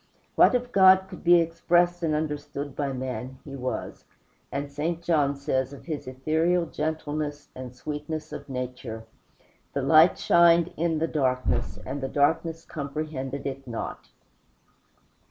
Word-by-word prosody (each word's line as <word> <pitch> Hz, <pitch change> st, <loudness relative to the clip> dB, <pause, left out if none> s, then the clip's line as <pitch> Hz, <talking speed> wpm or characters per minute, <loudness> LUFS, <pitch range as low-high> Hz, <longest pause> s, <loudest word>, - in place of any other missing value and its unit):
What -, -, +5 dB
of 245 Hz, 0 st, -1 dB
God 190 Hz, -2 st, +7 dB
could 185 Hz, -2 st, -11 dB
be 175 Hz, +1 st, +7 dB
expressed 175 Hz, +1 st, +2 dB
and 160 Hz, -2 st, +1 dB
understood 145 Hz, -2 st, -4 dB
by 140 Hz, -2 st, -1 dB
man 130 Hz, 0 st, -5 dB
He 140 Hz, -2 st, -7 dB
was, 130 Hz, -1 st, -5 dB, 0.5 s
and 140 Hz, +1 st, -3 dB
St. 160 Hz, +4 st, -2 dB
John 145 Hz, -5 st, +2 dB
says 135 Hz, -1 st, -1 dB
of 140 Hz, -, -12 dB
his 150 Hz, -5 st, -5 dB
ethereal 160 Hz, +7 st, +1 dB
gentleness 150 Hz, -2 st, -3 dB
and 125 Hz, -1 st, -8 dB
sweetness 150 Hz, +4 st, -5 dB
of -, -, -8 dB
nature: 125 Hz, -3 st, -5 dB, 0.7 s
"The 140 Hz, -, -1 dB
light 155 Hz, +5 st, +6 dB
shined 170 Hz, 0 st, +4 dB
in 165 Hz, 0 st, 0 dB
the 165 Hz, +1 st, 0 dB
darkness 130 Hz, -, 0 dB
and 140 Hz, +2 st, -4 dB
the 135 Hz, -, -2 dB
darkness 160 Hz, +4 st, +1 dB
comprehended 140 Hz, -2 st, -5 dB
it 135 Hz, -1 st, -5 dB
not." 115 Hz, -2 st, -6 dB
150 Hz, 140 wpm, -26 LUFS, 135-165 Hz, 0.7 s, God